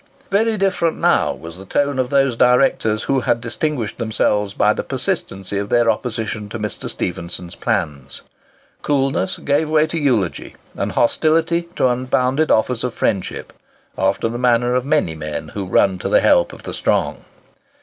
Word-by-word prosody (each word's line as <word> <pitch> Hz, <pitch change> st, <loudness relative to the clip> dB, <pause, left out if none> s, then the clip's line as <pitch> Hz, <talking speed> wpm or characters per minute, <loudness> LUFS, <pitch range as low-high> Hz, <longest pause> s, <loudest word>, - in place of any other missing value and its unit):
Very 220 Hz, +2 st, +2 dB
different 190 Hz, -4 st, +1 dB
now -, -, +2 dB
was 85 Hz, +2 st, -9 dB
the -, -, -9 dB
tone 140 Hz, +6 st, 0 dB
of 125 Hz, -1 st, 0 dB
those 135 Hz, -3 st, +2 dB
directors 125 Hz, -3 st, +3 dB
who 135 Hz, -1 st, +1 dB
had 120 Hz, -1 st, +1 dB
distinguished 120 Hz, 0 st, -3 dB
themselves 105 Hz, -3 st, 0 dB
by -, -, +3 dB
the -, -, -3 dB
persistency 95 Hz, +1 st, -3 dB
of 100 Hz, 0 st, -4 dB
their 120 Hz, -1 st, +4 dB
opposition 110 Hz, -2 st, -4 dB
to 120 Hz, -, -5 dB
Mr. 105 Hz, -2 st, -5 dB
Stephenson's 85 Hz, 0 st, -5 dB
plans. 80 Hz, -, -3 dB, 0.6 s
Coolness 135 Hz, -8 st, 0 dB
gave 145 Hz, +2 st, 0 dB
way 155 Hz, 0 st, +4 dB
to 165 Hz, +1 st, -3 dB
eulogy, 120 Hz, -, 0 dB, 0.2 s
and -, -, -3 dB
hostility 165 Hz, +6 st, +2 dB
to -, -, +3 dB
unbounded 130 Hz, +4 st, +1 dB
offers 115 Hz, +2 st, +2 dB
of 125 Hz, -2 st, -3 dB
friendship—after 95 Hz, +3 st, -3 dB
the 120 Hz, +1 st, -4 dB
manner 120 Hz, 0 st, +2 dB
of 125 Hz, 0 st, 0 dB
many 150 Hz, -, +1 dB
men 75 Hz, -1 st, -5 dB
who 100 Hz, -2 st, -5 dB
run 95 Hz, 0 st, +2 dB
to -, -, -3 dB
the -, -, +4 dB
help 85 Hz, -, +4 dB
of -, -, -13 dB
the -, -, -6 dB
strong. -, -, 0 dB
120 Hz, 160 wpm, -19 LUFS, 100-140 Hz, 0.6 s, their